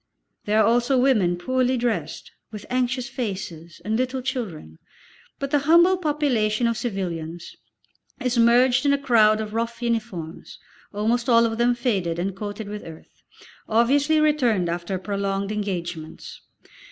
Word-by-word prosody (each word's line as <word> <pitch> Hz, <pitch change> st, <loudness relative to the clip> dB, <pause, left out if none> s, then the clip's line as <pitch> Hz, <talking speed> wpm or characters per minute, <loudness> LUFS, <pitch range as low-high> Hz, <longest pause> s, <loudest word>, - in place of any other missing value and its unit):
There 210 Hz, +1 st, +2 dB
are 215 Hz, -, +5 dB
also 240 Hz, +4 st, +2 dB
women 215 Hz, -10 st, +2 dB
poorly 255 Hz, +6 st, 0 dB
dressed, 240 Hz, -1 st, -3 dB, 0.2 s
with 210 Hz, -2 st, -8 dB
anxious 250 Hz, 0 st, 0 dB
faces, 190 Hz, -10 st, -6 dB
and 215 Hz, +1 st, 0 dB
little 255 Hz, +2 st, -1 dB
children, 175 Hz, -, -5 dB, 0.6 s
but 275 Hz, 0 st, -4 dB
the 295 Hz, -, +3 dB
humble 340 Hz, +6 st, +5 dB
population 275 Hz, -10 st, 0 dB
of 230 Hz, 0 st, +1 dB
civilians 175 Hz, -7 st, -5 dB, 0.6 s
is 250 Hz, -1 st, -1 dB
merged 245 Hz, +3 st, +4 dB
in 285 Hz, -1 st, +3 dB
a -, -, +2 dB
crowd 220 Hz, -5 st, +4 dB
of 215 Hz, -1 st, -5 dB
rough 230 Hz, +1 st, -2 dB
uniforms, 225 Hz, -9 st, -4 dB, 0.3 s
almost 230 Hz, +4 st, 0 dB
all 230 Hz, -1 st, +5 dB
of 225 Hz, 0 st, -2 dB
them 240 Hz, 0 st, +3 dB
faded 195 Hz, -9 st, -1 dB
and 185 Hz, +2 st, -2 dB
coated 205 Hz, +1 st, -6 dB
with 210 Hz, 0 st, -7 dB
earth, 160 Hz, -1 st, -13 dB, 0.5 s
obviously 280 Hz, +7 st, +3 dB
returned 250 Hz, -, +2 dB
after 175 Hz, +3 st, -3 dB
prolonged 200 Hz, +1 st, -2 dB
engagements. 175 Hz, -6 st, -5 dB
230 Hz, 140 wpm, -23 LUFS, 195-255 Hz, 0.6 s, are